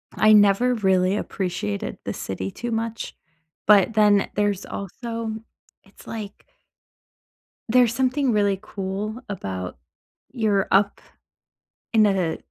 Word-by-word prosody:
I 215 0 +5
never 210 +4 +5
really 190 -3 +2
appreciated 175 - -3
the - - -3
city 95 0 -5
too 240 0 -5
much, 225 0 -3 0.5
but 210 +1 +5
then 210 -2 +4
there's 205 -2 0
also 230 +3 -5 0.5
it's 195 - -19
like 215 -3 -7 1.3
there's 240 -1 +4
something 260 0 +1
really 205 -2 +2
cool 210 +3 -5
about 95 - -5 0.5
you're 215 -6 +1
up 200 +1 +3 0.9
in 215 -1 +6
a 185 -5 +1
205 Hz, 110 wpm, -23 LUFS, 190-225 Hz, 1.3 s, in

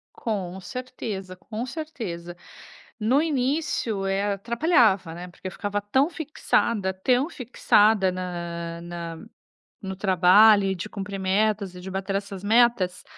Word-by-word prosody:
Com 190 -5 -3
certeza, 210 -5 -6
com 220 +5 -6
certeza. 225 - -6 0.6
No 250 +7 +3
início, 265 -8 -1
eh, 200 +1 0
atrapalhava, 225 - +2
né, 175 +1 -7
porque 185 +1 -8
ficava 205 +2 -3
tão 265 +9 +2
fixada, 235 - 0
tão 250 - +1
fixada 215 - +3
na 170 -2 -5
na 170 -1 -7 0.6
no 190 -2 -5
trabalho, 195 +2 +6
e 190 0 0
de 175 - -6
cumprir 195 -1 -6
metas, 200 0 0
e - - -9
de 190 - -7
bater 195 +1 -3
essas 195 -1 -4
metas, 215 -4 +3
200 Hz, 130 wpm, -25 LUFS, 185-235 Hz, 0.6 s, trabalho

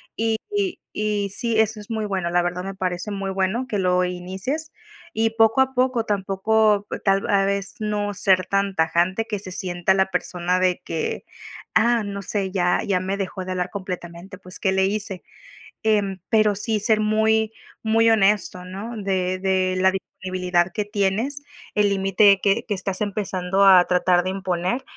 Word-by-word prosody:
Y 225 0 0 0.2
y 395 -3 -1
y 210 -1 -1
sí, 230 -2 0
eso 220 -1 +1
es 205 - -14
muy 220 -1 -2
bueno, 190 -4 -2
la 175 +1 +2
verdad 175 +1 -3
me 195 +1 -5
parece 185 +1 -3
muy 195 -1 -3
bueno 195 +6 -1
que 215 - -2
lo 180 -1 +2
inicies 190 - -4 0.4
y, 225 -3 +1
poco 225 +2 +3
a 265 0 +3
poco, 250 -2 +1
tampoco 205 +1 +1
e - - -3
tal 195 0 +1
a 200 -1 +3
vez 200 0 -1
no 210 -1 -1
ser 190 -2 +2
tan 195 +1 0
tajante, 175 +6 +1
que 210 -2 -3
se 190 -1 -8
sienta 180 -1 0
la 190 0 +3
persona 180 -1 -1
de 185 -1 +1
que, 160 -1 -3 0.5
ah, 235 0 +3
no 200 0 -5
sé, 195 -1 -2
ya 180 -2 +1
ya 185 -2 +1
me 190 +2 -2
dejó 190 -1 -4
de 185 - -5
hablar 180 0 -2
completamente, 185 -1 -7
pues, 185 -1 -9
¿qué 190 - +1
le 190 0 +2
hice? 200 -2 -2 0.6
Em, 205 -3 +1
pero 215 -2 +3
sí 215 +2 0
ser 215 +1 +3
muy 220 +1 +2 0.3
muy 225 +1 +3
honesto, 205 -4 +2
¿no? 200 +6 -7
De 185 -2 -1
de 185 -1 0
la 190 0 +4
disponibilidad 185 -2 -2
que 210 - -2
tienes, 210 +7 -1 0.3
el 210 -1 +3
límite 195 +1 +4
que 210 +4 +1
que 210 - -2
estás 190 0 -3
empezando 195 -2 0
a 185 -2 +8
tratar 180 0 +2
de 185 - -2
imponer, 190 +5 -2
195 Hz, 180 wpm, -23 LUFS, 185-215 Hz, 0.6 s, a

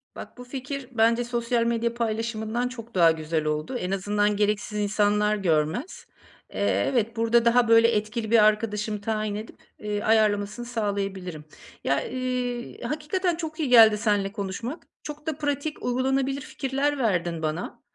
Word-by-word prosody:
Bak - - -10
bu 250 - -8
fikir 265 +1 -6
bence 230 0 +3
sosyal 235 0 0
medya 235 0 0
paylaşımından 225 0 -2
çok 235 -3 -10
daha 170 -2 +6
güzel 160 0 -2
oldu. 155 +10 -2
En 180 -4 -3
azından 205 +2 +1
gereksiz 210 0 0
insanlar 210 0 +2
görmez. 170 - -1 0.5
Eee, - - +1
evet 230 -3 0
burada 230 +1 +3
daha 235 0 +4
böyle 230 0 +6
etkili 220 0 -1
bir 230 -2 +6
arkadaşımı 210 0 +1
tayin 215 -1 -2
edip, 215 +2 -7 0.2
eee, 210 -1 -3
ayarlamasını 215 +1 +2
sağlayabilirim. 195 -8 -3 0.4
Ya, 140 - +1
iii, 250 -1 -3
hakikaten 310 +7 -1
çok 320 -1 -6
iyi 300 -4 0
geldi 225 -3 +8
seninle 205 -2 0
konuşmak. 205 - -5 0.2
Çok 300 0 -8
da 310 -2 -2
pratik, 290 +1 -3
uygulanabilir 265 +2 0
fikirler 275 +2 -2
verdin 175 -9 0
bana. 155 +2 -4
225 Hz, 145 wpm, -25 LUFS, 205-250 Hz, 0.5 s, geldi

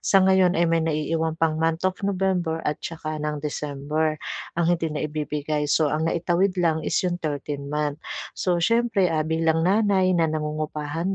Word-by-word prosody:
sa 195 - +4
ngayon 190 -2 +4
ay 170 - +4
may 165 0 +2
naiiwan 160 +1 -1
pang 160 -1 +1
month 165 +2 0
of 185 - -6
November 185 -4 0
at 150 +1 -1
saka 155 -2 -5
ng 150 0 -2
December 150 +1 -2 0.4
ang 170 -1 +2
hindi 165 -1 -2
naibibigay, 150 0 -2
so, 155 - +3
ang 155 +1 0
naitawid 175 +3 +1
lang 160 -2 +2
is - - 0
yung 175 -1 0
13 145 -2 -4
month. 150 0 -1 0.4
So, 180 -2 +1
siyempre 230 -1 +2
ah, 155 - +1
bilang 160 0 +1
nanay 195 -1 +3
na 165 - +3
nangungupahan 155 +3 -2
160 Hz, 165 wpm, -24 LUFS, 150-175 Hz, 0.4 s, sa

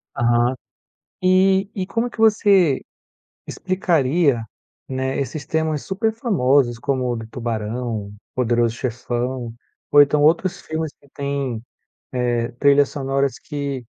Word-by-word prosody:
Aham. 120 +1 +2 0.7
E 190 +1 +4
e 190 -3 -3
como 230 +5 -1
que 235 - -15
você 200 -9 +4 0.7
explicaria, 160 -8 +1 0.5
né, 130 0 -2
esses 140 +1 -4
temas 160 -1 -1
super 210 +3 -1
famosos 140 - +2
como 130 -2 -1
o 120 - -1
do 115 -1 -7
Tubarão, 115 -2 -4 0.2
Poderoso 120 -2 +1
Chefão 120 0 -3 0.4
ou 145 - +8
então, 145 +1 +3
outros 170 +4 +2
filmes 160 -1 -4
que 140 - -23
tem, 140 -5 -3 0.5
eh, 120 -2 0
trilhas 140 +3 +4
sonoras 135 -1 -1
que 140 -4 -5
140 Hz, 120 wpm, -21 LUFS, 120-160 Hz, 0.7 s, ou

